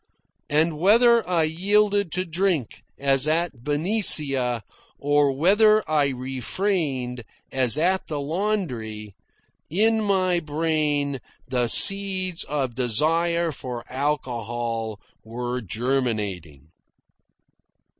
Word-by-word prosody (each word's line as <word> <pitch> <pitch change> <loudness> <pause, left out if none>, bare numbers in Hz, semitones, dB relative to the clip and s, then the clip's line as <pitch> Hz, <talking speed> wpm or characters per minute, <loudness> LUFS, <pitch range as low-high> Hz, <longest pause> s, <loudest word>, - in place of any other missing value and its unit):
And 155 +1 +1
whether 230 +4 +4
I 170 -3 +2
yielded 200 +3 +1
to 185 +1 -2
drink, 170 - -2 0.2
as 135 0 +1
at 160 -6 -1
Benicia, 145 - +2 0.3
or 145 0 +2
whether 210 +9 +3
I 150 -2 +2
refrained, 130 - -3 0.3
as 130 0 +2
at 185 +4 0
the 150 -2 -4
laundry, 140 - -3 0.6
in 220 +6 +2
my 185 -3 +1
brain 150 -3 -1 0.3
the 125 -2 0
seeds 190 +3 +4
of 135 -4 -3
desire 165 +8 +1
for 125 -3 -7
alcohol 120 -5 -3 0.2
were 120 +2 -5
germinating. 105 - -3
145 Hz, 95 wpm, -23 LUFS, 125-180 Hz, 0.6 s, whether